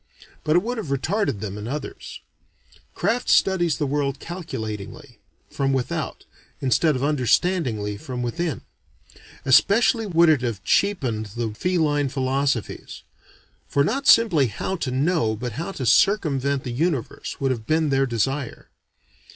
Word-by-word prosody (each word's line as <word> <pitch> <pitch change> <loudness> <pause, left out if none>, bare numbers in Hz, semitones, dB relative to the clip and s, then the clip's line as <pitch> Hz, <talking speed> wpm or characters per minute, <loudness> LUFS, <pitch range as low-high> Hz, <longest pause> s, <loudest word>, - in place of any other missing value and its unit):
But 155 - +2
it 175 - +4
would 240 +1 -3
have 205 - -5
retarded 140 - -1
them 105 -1 -5
in 105 - -6
others. 145 +4 -6 0.7
Craft 245 +2 0
studies 175 -5 +3
the 150 - -1
world 140 0 -1
calculatingly, 120 - -7 0.3
from 135 -1 0
without, 130 -2 -3 0.3
instead 140 +4 +2
of 130 - -2
understandingly 130 - +1
from 125 +3 -5
within. 165 +7 -2 0.8
Especially 220 - +4
would 170 -2 +4
it 155 -5 +4
have 115 -7 -3
cheapened 130 - +1
the 115 -2 -2
feline 150 -1 0
philosophies; 135 -2 -2 0.6
for 140 - +2
not 275 - -1
simply 185 - +5
how 120 - -3
to 140 - -3
know 135 -3 +1
but 120 +3 -5
how 165 - -5
to 130 - -4
circumvent 140 - +2
the 125 - -4
universe 145 -3 -2
would 135 -1 +1
have 115 -4 -4
been 155 -1 +2
their 135 0 +2
desire. 130 +3 -2
140 Hz, 140 wpm, -23 LUFS, 125-170 Hz, 0.8 s, simply